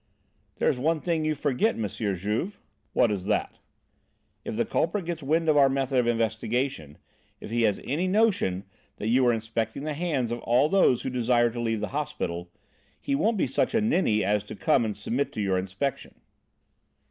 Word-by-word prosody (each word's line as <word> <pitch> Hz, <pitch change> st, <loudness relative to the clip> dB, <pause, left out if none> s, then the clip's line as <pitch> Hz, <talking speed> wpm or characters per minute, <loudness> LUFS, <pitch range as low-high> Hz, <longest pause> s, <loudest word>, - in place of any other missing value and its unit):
"There -, -, 0 dB
is 125 Hz, -, +1 dB
one 160 Hz, +4 st, +1 dB
thing 165 Hz, -1 st, -1 dB
you 155 Hz, 0 st, +1 dB
forget, 145 Hz, -, +1 dB
M. 110 Hz, -2 st, -2 dB
Juve." 105 Hz, -, -2 dB, 0.3 s
"What 115 Hz, -, +3 dB
is 95 Hz, -3 st, -3 dB
that?" -, -, -1 dB, 0.8 s
"If -, -, -4 dB
the -, -, +1 dB
culprit 170 Hz, +3 st, -1 dB
gets 170 Hz, -1 st, -4 dB
wind 160 Hz, +4 st, +1 dB
of 155 Hz, -, +4 dB
our 140 Hz, -1 st, +6 dB
method 135 Hz, -1 st, +1 dB
of 120 Hz, -, +1 dB
investigation, 115 Hz, -, -1 dB, 0.4 s
if -, -, -9 dB
he 120 Hz, 0 st, +1 dB
has 100 Hz, -, -4 dB
any 160 Hz, +8 st, -1 dB
notion 185 Hz, -, +2 dB, 0.3 s
that 105 Hz, -, -3 dB
you 130 Hz, +3 st, +4 dB
are -, -, +5 dB
inspecting 110 Hz, +2 st, -3 dB
the 155 Hz, 0 st, -2 dB
hands 145 Hz, -7 st, -1 dB
of 120 Hz, -, -2 dB
all 125 Hz, +6 st, +2 dB
those 170 Hz, -10 st, +3 dB
who 130 Hz, -, -3 dB
desire 120 Hz, -1 st, +2 dB
to 120 Hz, -, -6 dB
leave 115 Hz, -2 st, -1 dB
the 105 Hz, -, -2 dB
hospital, 90 Hz, -, -3 dB, 0.5 s
he 280 Hz, -, -2 dB
won't 230 Hz, -5 st, +2 dB
be -, -, +2 dB
such 135 Hz, -, 0 dB
a -, -, +5 dB
ninny 185 Hz, -, +2 dB
as 105 Hz, +2 st, +1 dB
to -, -, -8 dB
come 135 Hz, -7 st, +2 dB
and 105 Hz, -2 st, -3 dB
submit 130 Hz, +7 st, -2 dB
to -, -, -5 dB
your 95 Hz, -3 st, +1 dB
inspection." 100 Hz, +9 st, -4 dB
125 Hz, 195 wpm, -27 LUFS, 110-155 Hz, 0.8 s, our